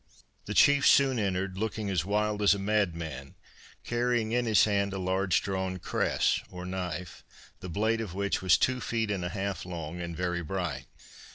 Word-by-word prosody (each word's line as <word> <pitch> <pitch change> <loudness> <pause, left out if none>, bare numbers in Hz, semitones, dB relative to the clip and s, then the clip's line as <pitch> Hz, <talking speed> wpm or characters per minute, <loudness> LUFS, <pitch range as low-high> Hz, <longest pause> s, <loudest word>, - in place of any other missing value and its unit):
The 105 - -5
chief 145 0 +5
soon 135 -3 +5
entered, 95 -1 -2
looking 110 -2 -2
as 90 -4 +1
wild 105 +2 0
as 100 -1 +5
a - - -4
madman, 85 -9 -2 0.5
carrying 120 -2 0
in 120 0 +1
his 110 -3 +5
hand 100 -2 +1
a - - -3
large 95 -1 +1
drawn 95 -1 -2
cress - - 0
or 90 0 -8
knife, 90 -2 -5 0.4
the 90 - -7
blade 110 +6 0
of 95 -5 -6
which 100 0 -1
was 95 -2 +5
two 130 -1 +1
feet 115 -3 -1
and 95 -3 -2
half 95 +2 -3
long 85 -1 -6
and 85 -1 -5
very 90 -1 -1
bright. 85 -6 -4
95 Hz, 175 wpm, -29 LUFS, 90-105 Hz, 0.5 s, chief